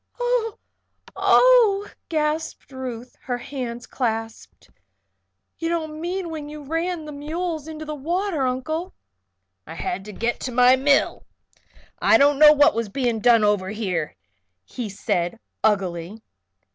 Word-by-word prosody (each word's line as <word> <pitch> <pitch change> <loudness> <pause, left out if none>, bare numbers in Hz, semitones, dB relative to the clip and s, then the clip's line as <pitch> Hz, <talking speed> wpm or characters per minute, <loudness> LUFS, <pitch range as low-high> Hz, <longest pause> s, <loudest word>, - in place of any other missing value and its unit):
"Oh, 485 -3 0 0.6
oh!" 455 -5 +5 0.2
gasped 310 -1 -2
Ruth, 250 -2 -7
her 245 -1 -2
hands 245 -2 -6
clasped. 225 - -4 0.9
"You 330 - -2
don't 315 -2 -3
mean 355 0 -3
when 300 -2 -6
you 300 0 -9
ran 330 +2 -2
the 300 - -7
mules 315 +2 -4
into 310 -1 -7
the 305 - -5
water, 330 0 -1
Uncle?" 315 +8 -3 0.7
"I - - -8
had 360 - -3
to 210 - -8
get 230 +4 -2
to 255 - -4
my 250 +1 +6
mill. 280 +2 +1 0.7
I 335 - +6
didn't 285 -1 +4
know 305 -1 +10
what 290 -1 +5
was 230 -2 -2
being 240 0 -1
done 230 0 +5
over 205 -3 +1
here," 185 -8 -3 0.5
he 230 - -6
said, 175 0 -2 0.3
uglily. 195 0 -1
280 Hz, 135 wpm, -23 LUFS, 230-325 Hz, 0.9 s, know